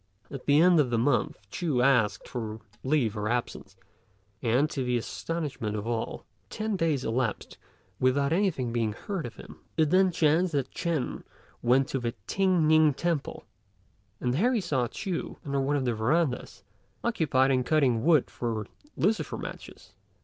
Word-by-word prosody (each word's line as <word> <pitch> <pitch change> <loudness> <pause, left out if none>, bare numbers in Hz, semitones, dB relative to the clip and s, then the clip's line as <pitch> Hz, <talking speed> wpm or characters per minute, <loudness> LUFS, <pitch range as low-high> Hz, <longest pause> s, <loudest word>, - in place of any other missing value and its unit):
At 135 -2 -8
the 145 +1 +5
end 175 0 +6
of 140 -4 +3
the 120 - +1
month 120 +3 +1
Ch'u 150 -9 0
asked 125 -6 +2
for 110 -3 -5 0.2
leave 130 -6 +1
of 105 0 -2
absence, 120 +1 -3 0.7
and, 125 +5 +2
to 135 - -2
the 125 -1 +1
astonishment 135 -4 -4
of 105 0 -4
all, 115 -1 -3 0.2
ten 215 -1 -2
days 160 -7 0
elapsed 115 -1 -2 0.4
without 140 +3 +2
anything 165 - 0
being 115 -3 0
heard 175 - -4
of 120 - -11
him. - - -12 0.2
It 155 -2 +3
then 185 0 +4
chanced 170 +1 +2
that 140 -3 -1
Ch'ên 165 -7 -2 0.4
went 130 +2 +3
to 135 - -1
the 120 -1 -3
T'ien 185 - +2
ning 155 -2 +5
temple, 170 -3 -2 0.7
and 125 -1 0
there 240 - +2
he - - +2
saw 135 -9 0
Ch'u 185 - -4
under 140 -1 0
one 140 +2 +1
of 135 -2 0
the 120 - +1
verandahs, 125 +5 -1 0.4
occupied 145 - +2
in 130 -1 +2
cutting 125 -6 +2
wood 160 -4 +3
for 115 -3 -3 0.3
lucifer 215 +2 0
matches. - - -9
135 Hz, 165 wpm, -28 LUFS, 120-165 Hz, 0.7 s, end